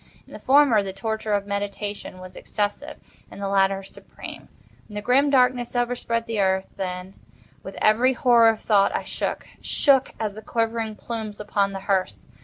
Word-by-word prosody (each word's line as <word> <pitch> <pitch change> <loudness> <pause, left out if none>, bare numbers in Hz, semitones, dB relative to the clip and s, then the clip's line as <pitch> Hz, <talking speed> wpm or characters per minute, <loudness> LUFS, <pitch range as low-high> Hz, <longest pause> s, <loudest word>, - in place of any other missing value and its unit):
In - - -16
the - - -8
former, 270 -5 +5
the 195 -1 -5
torture 220 +2 -3
of 200 0 -1
meditation 205 -1 -4
was 185 0 -11
excessive—in 210 +8 -5
the 200 0 -3
latter, 195 0 +2
supreme. 195 - -11 0.4
When 210 - -12
the 210 - -3
grim 275 +5 +3
Darkness 250 -2 +2
overspread 240 -1 -1
the 225 -2 -3
Earth, 190 -1 +1
then, 180 0 -5 0.5
with 195 - -9
every 240 +5 +4
horror 240 -2 +5
of 220 -1 -1
thought, 200 -2 +3
I - - -1
shook—shook 270 -3 0
as 215 -2 -2
the 215 - -9
quivering 225 -1 -2
plumes 220 -2 -6
upon 200 -1 0
the 195 - -5
hearse. 190 -2 -1
215 Hz, 165 wpm, -24 LUFS, 195-235 Hz, 0.5 s, former